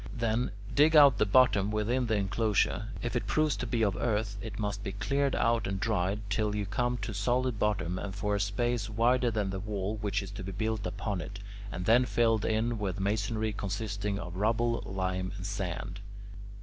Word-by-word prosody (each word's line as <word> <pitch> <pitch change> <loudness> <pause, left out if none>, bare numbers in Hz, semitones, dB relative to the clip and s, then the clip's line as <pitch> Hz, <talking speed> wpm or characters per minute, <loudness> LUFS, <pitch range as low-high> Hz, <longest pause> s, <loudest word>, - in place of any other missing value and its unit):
Then, 115 +1 0 0.2
dig 155 +3 +5
out 140 -5 +8
the 105 - +3
bottom 105 -3 +4
within 115 +4 0
the 110 - +1
enclosure. 105 +1 +1 0.2
If 120 +1 -2
it 120 - -1
proves 155 -1 +2
to 125 - -3
be 115 0 +1
of 100 -3 +2
earth, 105 -1 -1
it 105 -2 -6
must 105 -1 -3
be 100 - -4
cleared 140 +6 0
out 115 0 +2
and 95 0 -2
dried 100 -1 0
till 105 +1 0
you 105 -1 -1
come 120 +5 -1
to 110 - -3
solid 120 +3 0
bottom 95 -4 0
and 100 -1 -5
for 105 +1 -1
a 100 - +1
space 105 +2 -1
wider 120 +3 +2
than 105 -3 -1
the 95 - -3
wall 105 +1 -3
which 100 -2 -1
is 95 - -8
to 100 -2 -7
be 95 +1 -5
built 110 0 -1
upon 100 0 -3
it, 100 +3 -7 0.3
and 90 +2 -4
then 120 +4 +5
filled 115 -3 +2
in 110 +1 0
with 100 -2 -2
masonry 110 +2 -1
consisting 100 0 -3
of 90 -2 -6
rubble, 115 +3 +1
lime, 95 -1 -2
and 95 - -6
sand. 95 0 -4
105 Hz, 200 wpm, -30 LUFS, 100-115 Hz, 0.3 s, out